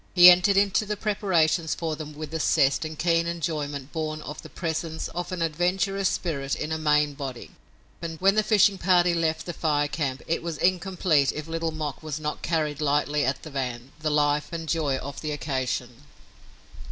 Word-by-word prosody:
He 180 0 +11
entered 180 +3 +4
into 200 +1 +3
the 210 0 -2
preparations 175 -6 +1
for 160 -2 -3
them 150 -1 -8
with 155 0 -7
a 160 - -1
zest 140 -2 +3
and 155 0 -6
keen 170 0 +2
enjoyment 150 -5 -3
born 155 -1 -3
of 150 - -7
the - - -11
presence 160 -1 -3
of 175 +1 -5
an 180 -2 -1
adventurous 185 +4 0
spirit 140 -6 -2
in 155 - -4
a 160 - 0
maimed 150 -2 +2
body, 135 -4 -6 0.5
and 165 -2 -5
when 195 +1 +4
the 215 - +3
fishing 205 -2 +3
party 175 -1 +4
left 160 -1 0
the 175 - -4
Fire 145 -3 +1
Camp 140 -3 -3
it 165 - -1
was 165 -2 -4
incomplete 180 -4 +2
if 150 - -5
Little 165 0 -2
Mok 155 -5 -5
was 155 -1 -4
not 150 -1 -4
carried 155 -3 -1
lightly 145 0 +1
at 135 +1 -1
the 155 - -9
van, 125 -2 -4
the 155 0 -1
life 150 0 +1
and 165 -1 -5
joy 150 -4 0
of 140 +1 -7
the 155 - -3
occasion. 130 -4 -2
155 Hz, 190 wpm, -26 LUFS, 145-175 Hz, 0.5 s, He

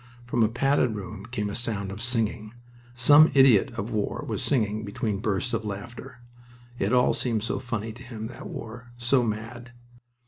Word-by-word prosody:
From 120 0 0
a 110 - +5
padded 125 -1 +1
room 105 +1 -7
came 105 -3 -3
a 100 - -4
sound 105 -4 -2
of 100 +3 -7
singing. 115 -2 -2 0.4
Some 145 +6 +7
idiot 130 -7 +6
of 105 +4 -4
war 105 -2 -2
was - - -3
singing 110 -5 0
between 105 -1 -2
bursts 105 +4 -1
of 115 -1 -1
laughter. 115 +4 -8 0.6
It 100 - 0
all 125 -1 +4
seemed 115 -4 -1
so - - -2
funny 115 -3 -4
to 120 - -13
him, 115 -4 -7
that 120 - -8
war, 120 +2 -8
so 120 +2 +2
mad! 115 +2 -5
115 Hz, 175 wpm, -26 LUFS, 105-125 Hz, 0.6 s, Some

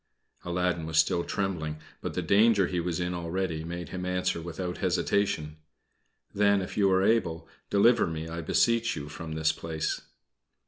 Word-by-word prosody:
Aladdin 90 -2 -1
was 80 -1 -2
still 85 +2 +3
trembling; 85 -7 -2 0.2
but - - -4
the 90 - -1
danger 100 +2 +4
he 90 0 -2
was 85 0 -2
in 90 0 -1
already 85 -1 -2
made 85 +1 -6
him 90 -1 -5
answer 90 -2 -1
without 90 +2 -5
hesitation: 90 -4 0 0.8
"Then, 100 0 +4
if 95 - -5
you 100 -2 +3
are 95 0 +3
able, 95 -7 +1 0.2
deliver 115 +4 +4
me, 80 0 -4
I 85 +1 -5
beseech 115 +7 +2
you, 75 0 -6
from 80 +1 -7
this 80 0 +2
place." 80 0 -3
90 Hz, 165 wpm, -28 LUFS, 80-95 Hz, 0.8 s, danger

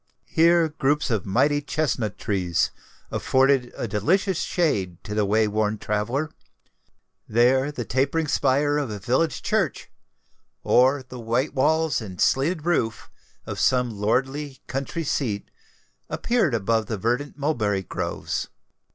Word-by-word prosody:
Here 170 0 +4
groups 150 -2 0
of 105 -5 -1
mighty 145 +9 +2
chesnut 140 -8 -1
trees 90 -5 0 0.4
afforded 130 -1 +2
a - - -2
delicious 165 - +1
shade 125 - 0
to 105 - -6
the 105 -1 +1
way 110 +2 +2
worn 105 0 0
traveller: 115 +10 -2 1.0
there 130 +5 +3
the 125 -5 -5
tapering 140 +7 0
spire 145 +2 +2
of 140 -5 -2
a 105 - -4
village 130 - 0
church, - - -1 0.7
or 130 +2 +4
the 125 -1 -9
white 120 +6 -1
walls 160 +1 +2
and 95 -5 -8
slated 155 +4 +1
roof 115 -11 -1 0.3
of - - -5
some 125 -2 +2
lordly 130 +7 -1
country 135 +5 -3
seat, 115 -8 -2 0.6
appeared 220 - +1
above 110 0 0
the 110 - -3
verdant 120 +9 -1
mulberry 110 -10 0
groves. - - -3
130 Hz, 130 wpm, -24 LUFS, 110-150 Hz, 1.0 s, Here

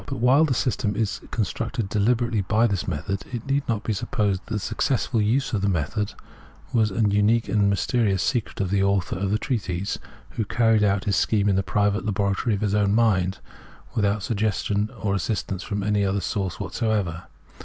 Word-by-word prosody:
But 135 - -4
while 130 +6 +5
the 135 -5 0
system 105 -3 0
is 105 -1 -1
constructed 115 +1 -2
dehberately 115 +1 +1
by 110 +3 +3
thi« 100 -6 -1
method, 95 +6 -3
it 120 -2 -5
need 140 +1 +1
not 115 -2 0
be 110 - -1
supposed 100 -1 -1
that - - -5
the - - +1
successful 115 +2 0
use 125 +6 +1
of 105 - +1
the 100 - +1
method 100 +5 -1 0.6
was 110 -3 +3
an 105 +1 +1
unique 105 +3 +3
and 100 -2 +2
mysterious 100 -1 +1
secret 120 -4 -1
of 95 -2 -1
the 100 -1 +2
author 100 -2 +1
of 95 +1 -1
the 105 - +2
treatise, 100 -6 -2 0.3
who 110 - -2
carried 110 0 +2
out 100 0 +2
his 100 - +1
scheme 105 -2 +2
in 100 - +3
the 95 - +2
private 105 +1 0
laboratory 105 +1 0
of 100 - -5
his 105 -2 0
own 105 -1 +2
mind, 95 -5 +2 0.6
without 100 -1 +1
suggestion 105 -1 0
or 100 -2 0
assistance 95 -1 -2
from 100 -1 -3
any 105 0 +1
other 100 0 +1
source 95 -2 -3
what - - -5
soever. 100 -6 -1
105 Hz, 195 wpm, -24 LUFS, 100-115 Hz, 0.6 s, while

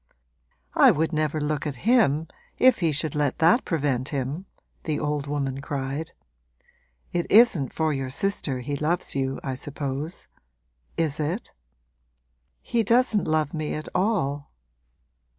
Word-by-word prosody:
'I - - +7
would 160 +2 +1
never 155 0 0
look 150 0 -1
at 145 - -3
him 180 - +3 0.3
if 255 -1 +5
he 165 -4 +2
should 150 +1 -2
let 145 -3 0
that 170 +10 +4
prevent 140 -6 0
him!' 145 +7 -3 0.4
the 155 -2 -1
old 150 -1 -2
woman 140 -2 -2
cried. 140 +2 -4 1.0
'It 175 -1 -1
isn't 200 - +5
for 160 -1 0
your 135 -2 -3
sister 140 -5 -2
he 145 +3 -3
loves 155 +5 -1
you, 135 -1 -1
I 135 - -2
suppose; 140 +4 -5 0.7
is 155 -2 0
it?' 165 +9 -2 1.1
'He 235 - +1
doesn't 230 -1 +2
love 155 -2 +1
me 155 -2 -2
at 155 - -6
all.' 145 -9 0
150 Hz, 135 wpm, -25 LUFS, 140-170 Hz, 1.1 s, I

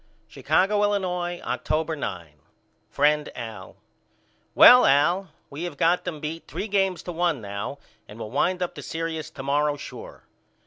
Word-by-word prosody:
Chicago, 205 +2 +1
Illinois, 180 -4 -1
October 160 +1 -1
9. 90 - -5 0.6
FRIEND 150 +1 +2
AL: 115 -3 -8 0.8
Well 250 0 +9
Al 170 +7 +3 0.2
we 145 +3 -7
have 165 -5 -6
got 170 +4 +2
them 170 -4 -4
beat 155 +2 -6
three 215 - -5
games 195 -4 0
to 180 - -5
one 170 -4 0
now 100 +6 -5 0.3
and 105 - -12
will 110 -2 -7
wind 180 +7 +1
up 175 - -4
the - - -9
serious 165 -1 -4
to 135 - -9
morrow 145 +1 +1
sure. - - -10
160 Hz, 150 wpm, -25 LUFS, 140-180 Hz, 0.8 s, Well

